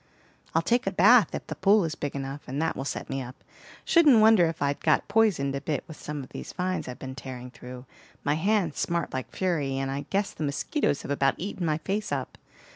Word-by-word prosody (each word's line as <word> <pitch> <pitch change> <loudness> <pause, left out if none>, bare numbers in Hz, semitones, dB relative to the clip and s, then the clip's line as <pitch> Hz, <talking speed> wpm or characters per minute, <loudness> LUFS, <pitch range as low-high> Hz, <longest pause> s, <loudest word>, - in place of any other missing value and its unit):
"I'll 165 - +3
take 240 +3 +1
a - - +2
bath 205 +2 +5
if - - -5
the - - -5
pool 200 0 +4
is 160 - -3
big 145 -2 -5
enough, 135 +1 -5
and 135 +3 -3
that 160 - 0
will 135 - -4
set - - -4
me 135 0 -3
up. 125 +1 -10 0.4
Shouldn't 305 -9 +6
wonder 215 -5 +6
if 160 - -4
I'd 140 0 0
got - - +2
poisoned 200 -11 +2
a 140 - -3
bit 150 0 -2
with 160 - -11
some 150 -2 -5
of 130 - -12
these - - -8
vines 185 +1 -2
I've 125 0 -6
been 130 0 -7
tearing 125 -2 -8
through. 125 0 -10 0.4
My 145 - +2
hands 180 -1 0
smart 170 -2 -1
like 130 -1 -4
fury, 150 -8 -1
and 135 0 -2
I 140 +1 -4
guess 200 +1 0
the - - -5
mosquitoes 145 - -1
have - - -5
about 135 -1 +2
eaten 185 -2 -3
my 155 -1 +1
face 200 +6 -3
up. - - -4
155 Hz, 230 wpm, -27 LUFS, 135-195 Hz, 0.4 s, Shouldn't